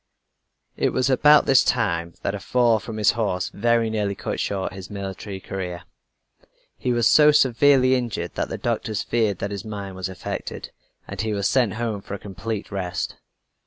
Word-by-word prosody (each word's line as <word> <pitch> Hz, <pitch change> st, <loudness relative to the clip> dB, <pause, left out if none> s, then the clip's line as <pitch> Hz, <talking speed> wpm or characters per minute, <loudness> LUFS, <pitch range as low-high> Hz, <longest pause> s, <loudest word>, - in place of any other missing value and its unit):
It -, -, +1 dB
was 130 Hz, +1 st, +1 dB
about 150 Hz, +3 st, +6 dB
this 135 Hz, -1 st, +5 dB
time 85 Hz, -8 st, 0 dB
that -, -, -1 dB
a -, -, -4 dB
fall 120 Hz, -3 st, +2 dB
from 110 Hz, 0 st, -7 dB
his 105 Hz, -, +4 dB
horse 100 Hz, -6 st, -1 dB
very 115 Hz, +1 st, +1 dB
nearly 105 Hz, -2 st, -1 dB
cut -, -, -4 dB
short 95 Hz, -2 st, -2 dB
his 95 Hz, 0 st, -9 dB
military 100 Hz, -1 st, -6 dB
career. 90 Hz, -2 st, -5 dB, 0.9 s
He 125 Hz, -, -2 dB
was 120 Hz, -1 st, +3 dB
so 150 Hz, -1 st, +7 dB
severely 135 Hz, -1 st, +4 dB
injured 120 Hz, -9 st, -2 dB
that -, -, -2 dB
the -, -, -4 dB
doctors 110 Hz, -2 st, -2 dB
feared 110 Hz, -5 st, 0 dB
that 100 Hz, +2 st, -4 dB
his 100 Hz, 0 st, -5 dB
mind 100 Hz, -3 st, -6 dB
was 95 Hz, 0 st, -4 dB
affected, 95 Hz, -, -6 dB, 0.4 s
and -, -, -4 dB
he 110 Hz, -1 st, -1 dB
was 100 Hz, -1 st, 0 dB
sent 125 Hz, -6 st, +2 dB
home 110 Hz, -3 st, -3 dB
for 100 Hz, -, -6 dB
a -, -, -5 dB
complete 100 Hz, +2 st, -6 dB
rest. 90 Hz, -3 st, -3 dB
105 Hz, 180 wpm, -23 LUFS, 95-120 Hz, 0.9 s, so